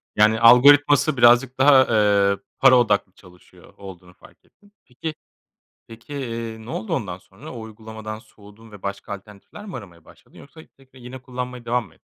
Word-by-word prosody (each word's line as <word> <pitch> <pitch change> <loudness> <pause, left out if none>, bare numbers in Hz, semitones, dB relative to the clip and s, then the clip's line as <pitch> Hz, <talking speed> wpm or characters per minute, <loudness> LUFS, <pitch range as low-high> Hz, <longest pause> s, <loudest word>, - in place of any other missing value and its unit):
Yani, 110 +1 +3
algoritması 140 +4 +5
birazcık 125 +2 +4
daha, 130 0 +5
eee, 100 -2 +2 0.2
para 130 -1 +6
odaklı 105 -5 0
çalışıyor 90 -2 -20
olduğunu 90 -2 -13
fark - - -22
ettin. 205 +1 -28
Peki 140 +5 -7 0.7
peki, 115 +5 -14
eee, 115 -4 -6
ne - - -9
oldu 110 - -4
ondan 90 -4 -5
sonra? 95 +1 -14
O 120 - -8
uygulamadan 110 -1 -9
soğudun 105 +1 -19
ve 105 - -14
başka 100 +1 -6
alternatifler 105 - -14
mi 190 - -8
aramaya 90 -8 -13
başladın - - -20
yoksa 160 +3 -15 0.2
tekrar 130 -1 -21
yine 125 +2 -10
kullanmaya 125 -1 -7
devam 120 -1 -2
mı - - -22
ettin? - - -32
115 Hz, 170 wpm, -21 LUFS, 105-130 Hz, 0.7 s, para